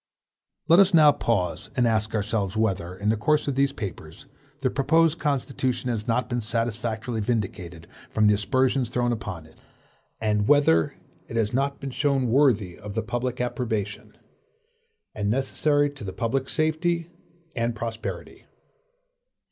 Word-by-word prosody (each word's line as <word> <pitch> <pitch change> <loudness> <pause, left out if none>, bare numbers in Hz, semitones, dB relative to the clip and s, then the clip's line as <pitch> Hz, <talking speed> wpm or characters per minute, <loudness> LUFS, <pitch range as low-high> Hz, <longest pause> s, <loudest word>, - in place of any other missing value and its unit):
Let 170 +2 +7
us 195 -2 +5
now 150 -2 +8
pause 105 -11 -1
and 125 - +2
ask 110 -1 0
ourselves 105 -1 -1
whether, 95 -5 -1
in 100 +3 -1
the 110 - +3
course 150 +9 +1
of 140 - 0
these 135 +1 +2
papers, 95 - -8 0.4
the 130 -2 +1
proposed 160 +3 +2
Constitution 130 -3 -1
has 110 -1 -4
not 115 0 +1
been 120 -1 -2
satisfactorily 115 0 -2
vindicated 95 -7 -3 0.2
from 110 - +2
the 105 - +6
aspersions 125 +5 +1
thrown 120 0 0
upon 95 -8 -5
it; 80 - -21 0.6
and 105 -1 +1
whether 110 - +4 0.3
it - - -8
has 110 -1 0
not 140 +2 0
been 135 -1 -5
shown 140 +1 +1
to - - 0
be 115 - 0
worthy 115 -10 +2
of 105 -1 -8
the 115 - -1
public 120 +2 -3
approbation, 110 -4 -3 1.0
and 105 -1 -2
necessary 145 +4 +1
to 140 -5 -11
the 95 -2 -5
public 130 +3 -1
safety 165 +2 0 0.4
and 115 -1 -1
prosperity. 115 0 -6
115 Hz, 155 wpm, -25 LUFS, 105-135 Hz, 1.0 s, now